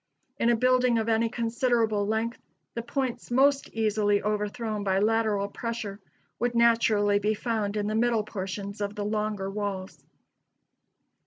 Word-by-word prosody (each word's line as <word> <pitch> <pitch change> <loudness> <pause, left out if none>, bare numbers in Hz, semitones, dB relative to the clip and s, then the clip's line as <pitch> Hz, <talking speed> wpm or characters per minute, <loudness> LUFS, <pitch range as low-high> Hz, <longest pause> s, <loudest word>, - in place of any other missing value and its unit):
In 230 - +3
a 240 - +5
building 250 0 +3
of 220 0 -1
any 225 +1 +2
considerable 230 -3 0
length, 225 +2 -1 0.3
the 235 - -3
points 255 +1 -3
most 275 +3 +3
easily 210 -2 +1
overthrown 210 +1 -2
by 190 -1 +1
lateral 215 -1 +1
pressure 215 -2 -5 0.4
would 245 0 0
naturally 225 -3 +4
be 210 +1 0
found 215 -2 -2
in 205 - -1
the 215 - -1
middle 230 -1 +2
portions 200 +1 -5
of 205 0 -2
the 205 -1 -3
longer 210 -2 -2
walls. 195 -2 -5
220 Hz, 145 wpm, -27 LUFS, 205-235 Hz, 0.4 s, a